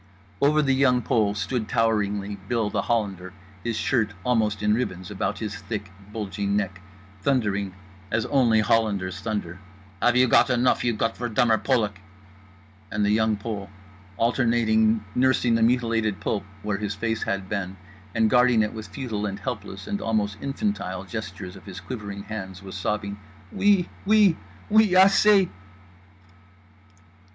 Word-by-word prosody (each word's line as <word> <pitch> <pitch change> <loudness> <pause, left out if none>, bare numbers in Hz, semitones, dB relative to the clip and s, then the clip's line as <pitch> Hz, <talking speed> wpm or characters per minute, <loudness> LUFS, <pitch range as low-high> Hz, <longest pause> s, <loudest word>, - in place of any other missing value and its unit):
Over 150 +2 +4
The 135 -2 +2
Young 130 -2 +3
Pole 105 -3 +1
stood 110 +2 -2
toweringly 105 -3 0
Bill 115 -4 0
The - - 0
Hollander, 100 -6 -2 0.3
his 115 -2 -2
shirt 110 -5 0
almost 110 -4 +1
in 105 0 +3
ribbons 95 -6 -3
about 100 - -2
his 110 -1 -4
thick 100 -2 -6 0.2
bulging 100 -1 -2
neck, 95 -3 -3 0.4
thundering 100 -6 0 0.3
as 110 +1 0
only 120 -6 +3
Hollanders 100 -5 +1
thunder: 100 -5 -4 0.4
"Have 120 0 +4
you 130 0 +5
got 125 - +5
enough 125 0 +2
you 120 -2 +1
Gottverdummer 115 -1 +1
Polak?" 105 -7 0 0.9
and 105 0 0
The 105 - +2
Young 110 0 +2
Pole, 100 -2 -5 0.5
alternating 115 -2 +2
nursing 125 -2 +2
the 115 - +2
mutilated 115 -3 +1
pulp 100 -2 -2 0.2
where 105 -1 -1
his 105 -1 -3
face 110 +1 -2
had 100 -1 -2
been 95 -2 -4 0.4
and 110 -1 +3
guarding 125 -1 +4
it 105 - -3
with 110 -3 -7
futile 105 0 -4
and 100 -1 -4
helpless 95 -1 -6
and 205 - -3
almost 105 -2 0
infantile 135 - -2
gestures 100 -2 -7
of 100 - -14
his 95 0 -7
quivering 100 0 -6
hands, 95 -3 -7
was 95 - -9
sobbing: 100 +1 -3 0.3
"_Oui, 200 -3 +3 0.2
Oui, 210 -5 +5 0.4
Oui, 220 0 +6
Assez! 195 +1 +6
110 Hz, 145 wpm, -25 LUFS, 100-120 Hz, 0.9 s, Oui